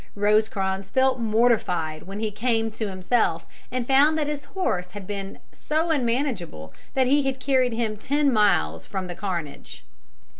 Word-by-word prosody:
Rosecrans 200 Hz, -2 st, +1 dB
felt 260 Hz, +2 st, +2 dB
mortified 210 Hz, -9 st, +1 dB
when 195 Hz, +2 st, -6 dB
he 220 Hz, -1 st, -1 dB
came 225 Hz, +1 st, 0 dB
to 215 Hz, -1 st, -3 dB
himself 185 Hz, -3 st, 0 dB, 0.3 s
and 250 Hz, -1 st, -2 dB
found 285 Hz, +5 st, +4 dB
that 305 Hz, -, 0 dB
his 290 Hz, -1 st, -4 dB
horse 275 Hz, -, -2 dB
had 205 Hz, -2 st, -7 dB
been 195 Hz, 0 st, -5 dB
so 320 Hz, +2 st, -1 dB
unmanageable 235 Hz, -, -1 dB, 0.2 s
that 260 Hz, -1 st, +3 dB
he 285 Hz, +3 st, +4 dB
had 270 Hz, -1 st, -2 dB
carried 255 Hz, -2 st, +2 dB
him 225 Hz, -2 st, -2 dB
ten 285 Hz, +4 st, +1 dB
miles 130 Hz, -, +2 dB
from 190 Hz, -1 st, -4 dB
the 180 Hz, -, -5 dB
carnage. 170 Hz, -, -6 dB
220 Hz, 155 wpm, -24 LUFS, 190-265 Hz, 0.3 s, found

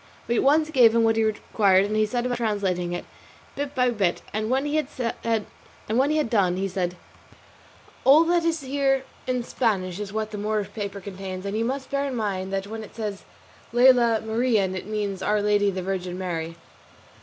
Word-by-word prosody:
We 235 Hz, -, +1 dB
at -, -, +3 dB
once 305 Hz, +3 st, +3 dB
gave 240 Hz, -6 st, +6 dB
him 230 Hz, -, +4 dB
what 225 Hz, 0 st, +3 dB
he 225 Hz, -, +2 dB
required, 200 Hz, -3 st, +2 dB
and 210 Hz, +1 st, -2 dB
he 215 Hz, 0 st, +2 dB
set 240 Hz, +3 st, -2 dB
about 245 Hz, -1 st, -1 dB
translating 195 Hz, -6 st, -1 dB
it 175 Hz, -, -4 dB, 0.5 s
bit 285 Hz, 0 st, -4 dB
by 250 Hz, -1 st, +3 dB
bit, 195 Hz, -6 st, 0 dB
and 215 Hz, +1 st, -2 dB
when 265 Hz, +3 st, +1 dB
he 295 Hz, +1 st, 0 dB
had 230 Hz, -6 st, -2 dB, 0.9 s
done 185 Hz, -5 st, +2 dB
he 195 Hz, +1 st, -1 dB
said: 180 Hz, -2 st, -2 dB, 1.1 s
"All 290 Hz, +5 st, +7 dB
that 340 Hz, 0 st, +2 dB
is 330 Hz, -2 st, 0 dB
here 270 Hz, 0 st, +1 dB, 0.2 s
in 250 Hz, -1 st, 0 dB
Spanish 195 Hz, -7 st, -1 dB
is 205 Hz, -2 st, -5 dB
what 215 Hz, 0 st, -3 dB
the 210 Hz, -, -5 dB
Moorish 210 Hz, -1 st, -2 dB
paper 200 Hz, -2 st, -5 dB
contains, 190 Hz, -1 st, -7 dB
and 200 Hz, +1 st, -3 dB
you 225 Hz, +1 st, 0 dB
must 265 Hz, +2 st, -3 dB
bear 280 Hz, 0 st, 0 dB
in 265 Hz, -, -4 dB
mind 195 Hz, -4 st, -2 dB
that 195 Hz, 0 st, -2 dB
when 220 Hz, +2 st, -6 dB
it -, -, -13 dB
says 210 Hz, -3 st, -5 dB, 0.5 s
'Lela 240 Hz, -2 st, +5 dB
Marien' 220 Hz, -4 st, +1 dB
it 185 Hz, -, -6 dB
means 205 Hz, -3 st, -3 dB
'Our 210 Hz, +2 st, +1 dB
Lady 205 Hz, 0 st, +2 dB
the 185 Hz, -1 st, -3 dB
Virgin 180 Hz, -1 st, -3 dB
Mary. 165 Hz, -3 st, -4 dB
215 Hz, 190 wpm, -25 LUFS, 195-250 Hz, 1.1 s, All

